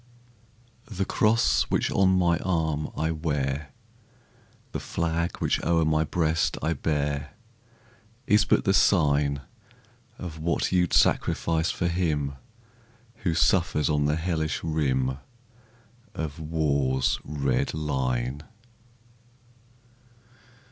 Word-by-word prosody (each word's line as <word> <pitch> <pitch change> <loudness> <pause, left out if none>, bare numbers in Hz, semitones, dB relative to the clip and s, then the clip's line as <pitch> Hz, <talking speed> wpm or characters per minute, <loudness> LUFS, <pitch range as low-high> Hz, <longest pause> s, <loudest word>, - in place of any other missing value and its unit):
The 100 -2 -2
cross 110 +4 +2
which - - 0
on 95 -1 +3
my 85 -2 +3
arm 80 -4 -1
I 80 +1 0
wear, 75 -3 -2 1.0
The - - -3
flag 85 +1 -2
which - - 0
o'er 80 -1 +2
my 80 0 +2
breast 80 0 0
I 80 +2 +1
bear, 75 +1 -2 0.9
Is 105 0 +4
but 100 - +2
the 95 - +2
sign 70 -7 +3 0.8
Of 80 -3 -7
what 85 +2 0
you 90 -1 +3
'd - - -9
sacrifice 80 0 +2
for 90 - -1
him 80 -5 -1 0.8
Who 85 -4 -1
suffers 80 0 +2
on 75 -1 +1
the 75 +1 +2
hellish 80 -2 -2
rim 65 -5 0 1.0
Of 80 0 -5
war's 70 -5 0
red 70 -2 -1
line. 65 -3 -2
80 Hz, 105 wpm, -26 LUFS, 70-85 Hz, 1.0 s, Is